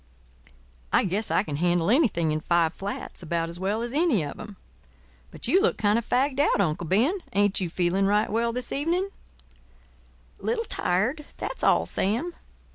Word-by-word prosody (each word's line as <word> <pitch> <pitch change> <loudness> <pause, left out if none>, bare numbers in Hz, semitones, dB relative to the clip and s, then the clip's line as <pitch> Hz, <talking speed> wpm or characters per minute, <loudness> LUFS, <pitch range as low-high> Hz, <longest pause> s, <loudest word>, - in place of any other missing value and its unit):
I - - +4
guess 200 +3 -1
I - - +2
can 145 -8 -4
handle 175 +3 +2
anything 215 - +2
in 155 - 0
five 170 0 +2
flats 200 0 -6
about 170 -1 -2
as 170 +1 -9
well 205 +4 -1
as 240 +1 -5
any 295 - +2
of 145 - -8
'em. 210 -2 -9 0.7
But - - -6
you 370 +10 +4
look 445 - +2
kind 210 +1 +2
of 235 - -10
fagged 265 +2 +1
out, 290 - +3
Uncle 170 -3 0
Ben—ain't 205 - +1
you 180 - -1
feeling 180 +3 +1
right 210 +2 +2
well 230 +2 +1
this 250 +1 -4
evening?" 345 +7 0 1.3
"Little 460 0 -1
tired; 250 - -1
that's - - -5
all, - - +4
Sam. 240 - -1
210 Hz, 170 wpm, -26 LUFS, 175-265 Hz, 1.3 s, I